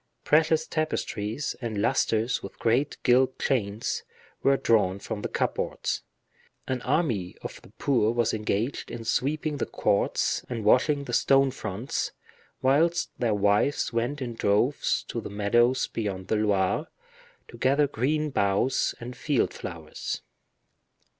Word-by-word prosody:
Precious 160 +1 +3
tapestries, 140 -6 -2
and 110 -4 -3
lusters 115 +1 +1
with 100 - -9
great 125 +6 +1
gilt 130 +1 +4
chains, 110 -5 -1 0.4
were 135 0 +4
drawn 110 -7 +2
from 105 +1 -5
the - - -2
cupboards; - - -1 0.7
an 130 -1 -2
army 125 - 0
of - - -7
the - - -16
poor 120 -6 +2
were 120 0 +1
engaged 110 +3 -2
in 115 - -6
sweeping 150 +5 0
the - - -1
courts 100 -1 +1
and 115 -4 -4
washing 140 +6 +4
the - - -6
stone 135 -1 +4
fronts, 110 -1 -3 0.5
whilst 165 +6 +3
their 115 -4 +1
wives 105 +7 +2
went 125 +5 -1
in 120 -2 -4
droves 115 +5 +1
to 115 - -5
the - - -7
meadows 120 +5 +2
beyond 95 -4 -4
the - - +2
Loire, 100 -3 +1 0.6
to - - -12
gather 140 +4 +3
green 145 +3 0
boughs 100 +3 +1
and 125 +1 -7
field 145 -5 0
flowers. - - -6
120 Hz, 135 wpm, -27 LUFS, 105-140 Hz, 0.7 s, gilt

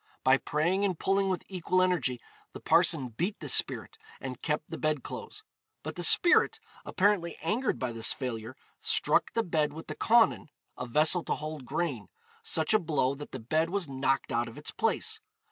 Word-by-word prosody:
By 130 +1 +5
praying 170 +6 0
and 190 -4 0
pulling 195 +2 +1
with 185 - -2
equal 185 -1 -1
energy, 175 -9 +1 0.3
the - - -8
parson 130 -2 +3
beat 175 - -3
the - - -7
spirit, - - +2 0.2
and 130 -2 -7
kept 150 -1 -2
the - - -5
bed 155 -3 0
clothes. - - -8 0.4
But 155 +1 -6
the 175 - -5
spirit, 345 - +5 0.2
apparently 190 -4 +1
angered 225 +10 0
by 130 -2 -3
this 115 0 -1
failure, 120 -2 -5 0.2
struck - - +2
the 230 - +1
bed 155 -5 0
with 160 +2 -9
the - - -6
cawnen 230 -6 +3 0.3
(a 125 - -6
vessel 155 +7 +3
to - - 0
hold 155 -4 -7
grain) 135 -12 -2 0.3
such 160 +5 0
a 215 - +5
blow 150 -6 0
that 145 +1 -9
the 130 - -6
bed 155 +8 0
was 190 -2 -1
knocked 135 0 -1
out 120 +1 0
of 115 - -11
its 150 - -4
place. 445 0 -1
155 Hz, 185 wpm, -29 LUFS, 130-185 Hz, 0.4 s, By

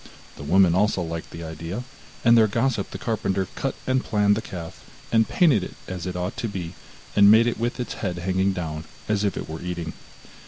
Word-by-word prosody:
the - - -11
woman 85 +4 +4
also 100 +1 +2
liked 85 -1 -4
the 85 - -8
idea, 80 +7 -5 0.4
and 115 0 +7
their 110 -2 +6
gossip 115 -1 0
the - - -6
carpenter 100 -4 -1
cut 135 - -2
and 130 0 +1
planed 105 -1 +3
the 110 - -2
calf, 85 -6 -8 0.3
and 115 -1 +3
painted 145 - +4
it - - -7
as 90 -1 -5
it 90 - -4
ought 90 +1 -3
to 115 - -2
be, 90 -5 -5 0.4
and 100 0 +7
made 110 +2 +7
it 120 - -1
with 120 +2 -2
its 125 - -3
head 90 -4 -2
hanging 95 +2 +1
down 80 -4 -4 0.2
as 105 -1 +1
if 100 -3 0
it - - -4
were 80 0 -6
eating. 85 -2 -4
95 Hz, 210 wpm, -24 LUFS, 85-110 Hz, 0.4 s, and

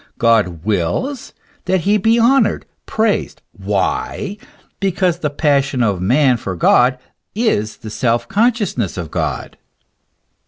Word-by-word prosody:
God 105 -8 +1
wills 110 - -2 0.3
that 185 -1 +1
he 205 +4 +2
be 225 +4 +3
honoured, 240 0 +3 0.2
praised. 220 -1 -1
Why? 205 -1 -2 0.4
because 185 -3 0
the 150 - -1
passion 140 -3 +1
of 100 -5 0
man 125 +5 +3
for 95 -4 -5
God 125 +8 +3 0.4
is 155 - 0
the 110 - -9
self 115 +1 0
consciousness 205 - 0
of 85 -4 -5
God. - - -3
140 Hz, 120 wpm, -17 LUFS, -, 0.4 s, be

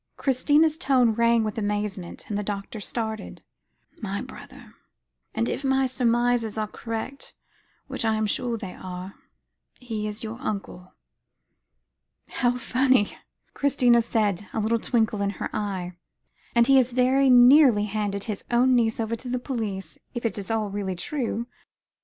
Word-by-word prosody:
Christina's 295 +4 +2
tone 255 -4 +3
rang 235 0 +3
with 215 +1 -3
amazement, 205 -3 -3
and 210 - -3
the 205 - 0
doctor 205 +1 -5
started. 220 0 -5 0.6
"My 200 -2 -3
brother; 260 -3 -12 0.6
and 230 - +1
if - - -3
my 265 0 +2
surmises 240 -3 +1
are 215 - 0
correct, 230 +5 -6 0.5
which - - -3
I 220 -1 +2
am 215 0 0
sure 235 +2 -1
they 195 -4 -7
are, 185 +1 -8 0.7
he 220 -4 -4
is 210 +3 -5
your 225 +2 -6
uncle." 195 -6 -5 1.3
"How 245 0 0
funny," 255 -2 +2 0.4
Christina 245 -4 +3
said, 210 -4 0
a - - -1
little 225 +2 +1
twinkle 220 -3 0
in 200 - +1
her - - -4
eyes; 195 -4 -3 0.6
"and 235 0 +6
he 270 0 +6
very 255 +2 +2
nearly 250 -3 +7
handed 205 -1 -2
his 210 -3 -5
own 250 +2 +4
niece 230 -2 +2
over 225 0 -1
to 245 +2 -9
the 250 - 0
police 220 -7 -4 0.2
if 240 - -4
it 220 - 0
is 195 - -7
all 220 -2 -1
really 195 -2 -3
true. 235 - -3
225 Hz, 150 wpm, -25 LUFS, 210-250 Hz, 1.3 s, nearly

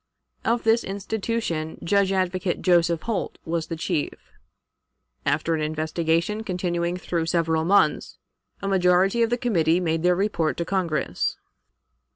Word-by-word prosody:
Of 230 +1 +1
this 225 +1 +3
institution 195 -5 -3
Judge 200 +2 +2
Advocate 185 -1 -1
Joseph 170 -2 +3
Holt 225 -5 -3
was 165 0 -2
the 165 - -4
chief. 160 -2 -2 1.1
After 155 +4 +1
an 160 - -1
investigation 160 +6 -1
continuing 175 -2 -1
through 170 -2 -2
several 165 -2 +1
months, 200 +4 +2 0.5
a - - -1
majority 190 +3 +3
of 230 - +3
the 240 - +1
committee 175 -9 +2
made 165 -2 0
their 180 +1 +3
report 175 -5 0
to 170 - -2
Congress. 175 -4 -1
175 Hz, 135 wpm, -24 LUFS, 165-195 Hz, 1.1 s, this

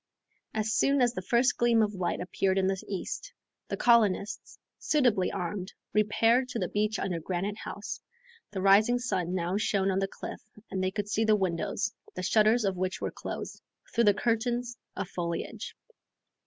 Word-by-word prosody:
As 215 0 0
soon 280 0 +3
as 245 -2 +3
the 185 - -4
first 235 +7 +2
gleam 235 -2 +4
of 210 0 -1
light 185 -3 -1
appeared 190 +1 0
in 190 - +3
the 190 0 -1
east, 200 - -4 0.4
the - - -3
colonists, 215 -3 +2 0.2
suitably 240 -11 +2
armed, 180 +2 -4 0.2
repaired 225 +4 +3
to 245 - -3
the - - -1
beach 210 +1 0
under 180 -3 -2
Granite 190 +5 -3
House. 205 - -6 0.5
The 190 -2 -4
rising 210 +5 +6
sun 185 -7 -1
now 180 +2 0
shone 195 -2 +1
on 190 - +1
the 195 - 0
cliff - - -8 0.3
and 190 -1 -1
they 185 - +2
could 205 +1 -3
see 210 +2 +1
the 215 -1 +4
windows, 190 +2 -1 0.2
the 185 - -4
shutters 215 +3 +4
of 190 -2 0
which 185 +1 -2
were - - -2
closed, - - -6 0.3
through 235 0 +3
the 205 -1 +5
curtains 240 +2 0 0.2
of 200 - -3
foliage. 170 -2 -4
205 Hz, 175 wpm, -29 LUFS, 185-230 Hz, 0.5 s, rising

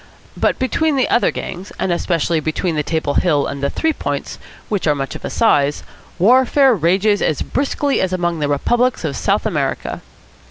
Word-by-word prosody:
But - - +1
between 300 +4 0
the 260 - +2
other 240 - +3
gangs, 185 +3 -6
and 185 - -1
especially 170 -1 0
between 155 +3 -2
the 150 - +1
Table 155 -1 -2
Hill 150 -5 +2
and 140 - -5
the 140 - 0
Three 320 -1 0
Points, - - -4 0.3
which 205 -6 -2
are 150 - +3
much 135 -1 -4
of - - -9
a - - -3
size, 145 -10 +2 0.3
warfare 260 +6 +4
rages 195 +3 +2
as 155 - 0
briskly 280 0 -1
as 190 - 0
among 175 -2 -1
the 145 - 0
republics 240 - +1
of - - -2
South - - 0
America. - - -2
180 Hz, 185 wpm, -18 LUFS, 155-245 Hz, 0.3 s, warfare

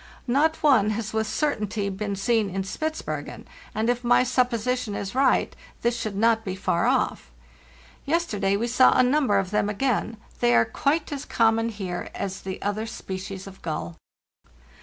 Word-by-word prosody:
Not 295 +7 +1
one 255 -9 +5
has 220 -2 -4
with 220 0 0
cer 285 +7 0
tainty 205 -2 -3
been 200 0 -3
seen 210 +1 +1
in 195 +1 -2
Spitzbergen, 315 +11 -4 0.3
and 220 +1 0
if 245 0 0
my 245 +1 +4
supposition 250 -2 0
is 200 -1 -4
right, 265 0 +2 0.3
this 235 0 +2
should 215 -4 -4
not 225 +2 +3
be 190 -3 -4
far 170 -2 0
off. - - 0 0.8
Yesterday 210 -12 +1
we 230 - -1
saw 250 +2 +5
a - - +6
number 255 -5 +3
of 195 -1 -1
them 210 -1 +1
again; 225 0 -1 0.2
they 120 0 +4
are 115 0 +5
quite 300 +3 0
as 280 -2 -4
common 225 0 +2
here 190 -5 -5
as 195 -1 -4
the 190 0 -5
other 210 +2 -2
species 190 -3 -6
of 195 -1 -12
gull. 120 - -4
220 Hz, 170 wpm, -25 LUFS, 195-250 Hz, 0.8 s, a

